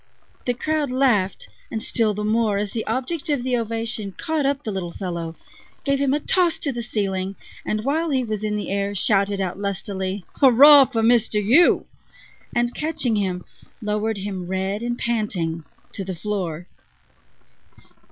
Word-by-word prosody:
The 245 - +1
crowd 305 +2 -1
laughed, 250 -7 +1 0.2
and 220 -1 -3
still 220 -4 +1
the 210 - -3
more 215 -1 +2
as 205 0 -2
the 225 - -4
object 300 +6 -2
of 285 -5 0
the 255 -1 +1
ovation 225 -3 -3
caught 310 - -1
up 280 +1 -1
the 215 - -3
little 180 -3 -4
fellow, 170 -3 -4 0.5
gave 275 -1 +1
him 275 -2 +2
a 290 - +2
toss 345 +1 +2
to 285 - -2
the 240 -2 -4
ceiling, 195 -4 -2 0.3
and, 215 0 -1
while 320 +4 +1
he 265 -3 +1
was 215 -3 -3
in 210 0 -1
the 210 - -3
air, 200 0 -1
shouted 200 +1 +2
out 190 0 -2
lustily: 195 -1 -3
"Hurrah 275 +2 +8
for 230 -3 -1
Mister 230 -2 +3
You!" 245 - +4 0.7
and, 240 0 +1
catching 300 -7 -1
him, 185 -3 -1 0.3
lowered 210 0 -1
him, 190 -2 -5
red 190 +3 -2
and 240 0 -2
panting, 180 -10 -2 0.3
to 195 - -4
the 190 -1 -5
floor. 175 -3 -3
215 Hz, 165 wpm, -23 LUFS, 195-255 Hz, 0.7 s, Hurrah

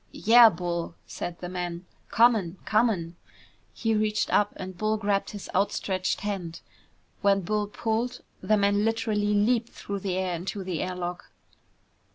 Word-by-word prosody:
"Yeah, 230 +1 +7
Bull," 170 -2 -4
said 175 -1 -6
the 180 - -4
man. 175 -1 -5 0.2
"Comin', 220 -6 +3
comin'!" 200 -7 +1 0.5
He 225 -2 -1
reached 215 0 0
up 205 0 +3
and 185 0 -7
Bull 215 +3 0
grabbed 200 -2 0
his 205 -2 -8
outstretched 190 -1 0
hand. 190 -5 -4 0.6
When 200 -1 +3
Bull 210 +3 -1
pulled, 230 +4 -2 0.2
the 215 - +2
man 200 0 +2
literally 215 -2 0
leaped 230 +3 +2
through 200 0 -6
the 185 -1 -2
air 185 -1 -1
into 190 +3 -4
the 185 -3 -3
air 185 0 -3
lock. 175 0 -5
200 Hz, 150 wpm, -27 LUFS, 180-215 Hz, 0.6 s, Yeah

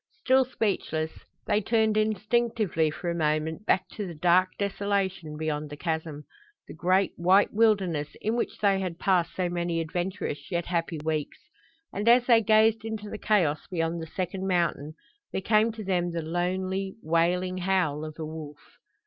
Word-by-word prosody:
Still 260 0 +4
speechless, 190 -9 -1 0.3
they 210 - +2
turned 220 0 +2
instinctively 215 -4 +1
for 170 +3 -4
a - - -1
moment 160 +3 -1
back - - +2
to 205 -3 -5
the 170 - -7
dark 180 +3 +4
desolation 195 -5 -2
beyond 150 -1 -3
the 145 - -8
chasm 160 -2 -3 0.4
the - - -9
great, 185 +4 +2
white 185 +4 +4
wilderness 195 -9 +1
in 220 - -1
which 240 - -2
they 200 -2 +2
had 180 -3 -3
passed 180 -3 +1
so 185 -1 0
many 175 -1 -1
adventurous 165 -3 -3
yet 170 -1 -1
happy 170 -2 -2
weeks; 155 -2 -2 0.6
and 205 +4 +1
as 245 +1 +6
they 235 -2 +5
gazed 220 0 +4
into 220 -2 -5
the - - -6
chaos 175 -9 +1
beyond 165 -1 -1
the 160 - -6
second 185 +3 -3
mountain 170 -4 0 0.4
there - - -1
came 215 +3 +3
to 220 -1 -8
them 180 -2 0
the 165 -1 -2
lonely, 185 +3 -2
wailing 180 +3 +1
howl 175 -5 0
of 155 -1 -7
a 160 - -4
wolf. 155 -2 -10
180 Hz, 165 wpm, -27 LUFS, 160-205 Hz, 0.6 s, as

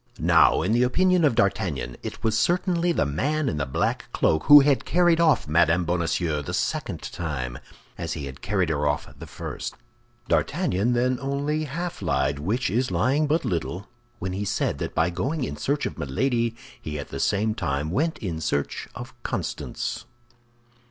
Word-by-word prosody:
Now, - - +4
in 95 - 0
the 120 +2 +3
opinion 180 +8 +3
of 145 -7 +3
D'Artagnan, 85 - 0
it - - -7
was 110 -1 +2
certainly 175 - +2
the 165 - +1
man 140 - 0
in 75 - -1
the 70 -2 -1
black 65 - -1
cloak 80 0 +1
who 145 0 +10
had 140 -1 +2
carried 175 -1 +3
off 155 - +3
Mme. 85 +3 +3
Bonacieux 85 -2 0
the 70 - -4
second - - -2
time, 70 -8 -4 0.4
as 85 -2 -3
he 75 -3 -5
had 65 0 -9
carried 95 -4 0
her 75 -2 0
off 75 0 -1
the - - -8
first. - - -6 0.5
D'Artagnan 125 - +1
then 125 +1 +1
only 145 +3 -1
half 170 +3 -5
lied, 70 -4 0
which 105 - -1
is 125 +4 +1
lying 145 +4 +2
but 155 +3 +1
little, 90 +2 -3 0.3
when 95 0 -4
he 100 +2 -2
said 100 - -1
that - - -4
by 80 +2 +2
going 135 - -2
in - - -3
search 145 +1 -1
of - - -5
Milady 115 - 0 0.3
he 75 -1 -5
at 70 - -6
the - - -5
same 110 +2 +1
time 75 -6 -2
went 160 - 0
in 85 -7 -4
search 70 -2 -2
of - - -8
Constance. - - -4
105 Hz, 180 wpm, -25 LUFS, -, 0.5 s, who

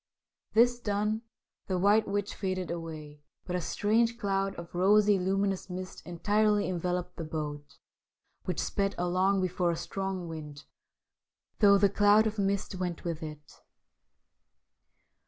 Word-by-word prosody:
This 240 +2 +5
done, 210 0 -1 0.5
the 185 - 0
White 205 +4 +4
Witch 205 0 -2
faded 185 -2 -3
away, 155 -3 -7 0.2
but 180 - -3
a 180 - -1
strange 225 +6 +1
cloud 195 -2 -1
of 170 0 -9
rosy, 205 +2 +4
luminous 195 0 0
mist 185 +1 -6
entirely 205 +3 +2
en 175 -2 -2
veloped 180 0 -2
the - - -4
boat, 150 -2 -5 0.7
which 180 -4 -2
sped 200 -1 -1
along 185 +2 +1
before 180 -1 0
a 170 - 0
strong 190 -2 -4
wind, 150 -2 -8 1.0
though 200 -2 +7
the 200 +1 +5
cloud 205 +2 +4
of 220 -1 -2
mist 200 0 0
went 180 -2 -4
with 165 -2 -3
it. 150 -1 -10
190 Hz, 135 wpm, -30 LUFS, 170-205 Hz, 1.0 s, though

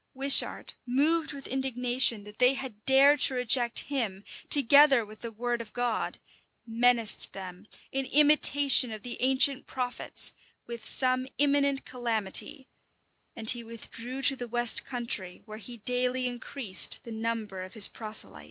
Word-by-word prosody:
Wishart, 275 +1 +4
moved 310 +6 -1
with 280 -2 -11
indignation 250 -3 -1
that 210 +1 -16
they 250 +2 +3
had 255 -6 -10
dared 275 +2 +4
to 265 - +6
reject 245 -1 +1
him, 220 -9 -6 0.3
together 280 -3 +4
with 215 +1 -16
the 235 - -8
word 240 +2 -5
of 220 -2 -14
God, 245 -2 -4 0.5
menaced 235 -1 0
them, 190 +1 -11 0.2
in 270 0 -4
imitation 285 -3 +3
of 215 -1 -10
the 245 - -8
ancient 265 +1 +1
prophets, 250 -1 -3 0.3
with 235 -2 -6
some 255 0 +2
imminent 280 -1 0
calamity; 245 +3 -2 0.7
and 225 -2 +3
he 240 -1 -4
withdrew 230 +3 -10
to 270 +1 +2
the 245 -2 -8
west 240 0 +4
country, 235 -8 -4
where 215 0 -12
he 240 +2 -12
daily 250 +3 -2
increased 240 -4 +1
the 235 - -12
number 220 -3 -6
of 185 +3 -11
his 215 -2 +7
proselytes. 215 - -2
245 Hz, 145 wpm, -26 LUFS, 225-265 Hz, 0.7 s, his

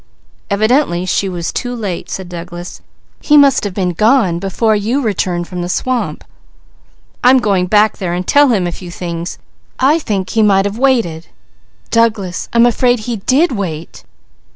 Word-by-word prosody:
"Evidently 215 -3 +1
she 195 +1 0
was 175 -2 -4
too 245 0 -3
late!" 200 -7 -5
said 190 -2 -5
Douglas. 175 0 -8 0.4
"He 295 - +3
must 280 -2 +5
have 200 -3 -4
been 185 -3 0
gone 210 -3 +2
before 215 +4 0
you 220 +6 0
returned 185 -7 -1
from 180 -1 -5
the 175 - -4
swamp." 230 -7 -2 1.0
"I'm 255 +2 +6
going 195 -7 +1
back 210 +2 +3
there 185 -4 -2
and 180 +1 -3
tell 285 +7 +4
him 210 -8 +1
a 175 - -2
few 175 +1 -9
things! 170 0 -5 0.4
I 285 +5 +3
think 200 - -3
he 225 - +2
might 195 -2 +3
have 205 +3 -3
waited. 230 -12 +1 0.6
Douglas, 215 -6 0
I'm 235 0 +4
afraid 245 0 +2
he 230 +1 -4
did 270 - +2
wait! 170 -8 -5
205 Hz, 165 wpm, -15 LUFS, 180-240 Hz, 1.0 s, I'm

